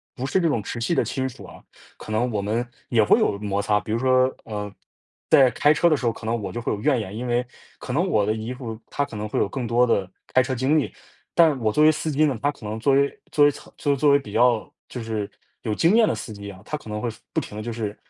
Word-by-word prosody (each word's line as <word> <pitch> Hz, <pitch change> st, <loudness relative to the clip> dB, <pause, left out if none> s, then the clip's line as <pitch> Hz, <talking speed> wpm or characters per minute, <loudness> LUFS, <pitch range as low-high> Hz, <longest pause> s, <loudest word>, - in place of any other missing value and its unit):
不 125 Hz, -, -4 dB
是 185 Hz, +7 st, +1 dB
这 170 Hz, -, +2 dB
种 120 Hz, -9 st, 0 dB
直 120 Hz, +3 st, -5 dB
系 170 Hz, +9 st, 0 dB
的 -, -, +3 dB
亲 130 Hz, -1 st, -2 dB
属 125 Hz, -, -12 dB
啊， -, -, -13 dB, 0.4 s
可 -, -, -9 dB
能 120 Hz, +3 st, +1 dB
我 105 Hz, -2 st, -1 dB
们， 110 Hz, +4 st, -1 dB, 0.2 s
也 115 Hz, -3 st, +4 dB
会 -, -, +5 dB
有 100 Hz, -, +1 dB
摩 100 Hz, -1 st, -2 dB
擦。 105 Hz, 0 st, +2 dB
比 105 Hz, -, -7 dB
如 115 Hz, -, +1 dB
说， 130 Hz, 0 st, +3 dB
呃， 105 Hz, -2 st, -5 dB, 0.6 s
在 130 Hz, -2 st, +6 dB
开 145 Hz, -, +3 dB
车 170 Hz, -, +3 dB
的 160 Hz, -, +4 dB
时 130 Hz, -4 st, -2 dB
候 -, -, +3 dB
可 110 Hz, -, -10 dB
能 115 Hz, 0 st, -1 dB
我 100 Hz, -, -4 dB
就 120 Hz, -, -4 dB
会 120 Hz, -, -2 dB
有 105 Hz, -, -5 dB
怨 135 Hz, -2 st, +2 dB
言。 105 Hz, -2 st, -6 dB
因 125 Hz, +3 st, -4 dB
为 120 Hz, +1 st, +1 dB, 0.3 s
可 125 Hz, -, -6 dB
能 170 Hz, +7 st, +1 dB
我 105 Hz, -, +2 dB
的 105 Hz, -, +1 dB
姨 110 Hz, +2 st, -5 dB
父 120 Hz, -4 st, -6 dB
他 145 Hz, -, -1 dB
可 115 Hz, -, -11 dB
能 105 Hz, 0 st, -4 dB
会 -, -, -3 dB
有 -, -, +2 dB
更 120 Hz, +3 st, -4 dB
多 120 Hz, +2 st, +4 dB
的， 100 Hz, -6 st, 0 dB, 0.2 s
开 130 Hz, -, +6 dB
车 130 Hz, +1 st, -2 dB
经 135 Hz, +5 st, +2 dB
历。 145 Hz, -, -3 dB, 0.4 s
但 165 Hz, -4 st, +5 dB
我 110 Hz, -2 st, +1 dB
作 150 Hz, -, +3 dB
为 155 Hz, -, +7 dB
司 155 Hz, +1 st, -3 dB
机 155 Hz, +1 st, +3 dB
呢， 140 Hz, -4 st, +1 dB
他 145 Hz, -, +2 dB
可 135 Hz, -6 st, -13 dB
能 110 Hz, +1 st, -4 dB
作 135 Hz, +4 st, +2 dB
为 140 Hz, +1 st, +1 dB
作 145 Hz, -, +5 dB
为 145 Hz, -, +5 dB, 0.4 s
作 145 Hz, +2 st, +3 dB
为 140 Hz, -, +6 dB
比 105 Hz, -8 st, -8 dB
较 120 Hz, -1 st, +3 dB, 0.2 s
就 125 Hz, -, -6 dB
是 110 Hz, -3 st, -3 dB, 0.3 s
有 110 Hz, -, -2 dB
经 170 Hz, -, +3 dB
验 225 Hz, -1 st, +5 dB
的 -, -, 0 dB
司 110 Hz, -, -7 dB
机 100 Hz, 0 st, -8 dB
啊， 95 Hz, -2 st, -11 dB
他 150 Hz, -, -3 dB
可 150 Hz, -7 st, -9 dB
能 105 Hz, 0 st, -3 dB
会， 120 Hz, -, -2 dB, 0.2 s
不 -, -, +1 dB
停 -, -, -8 dB
地 105 Hz, -, -4 dB
就 120 Hz, -, -4 dB
是 110 Hz, -3 st, -4 dB
120 Hz, 310 characters per minute, -24 LUFS, 110-140 Hz, 0.6 s, 为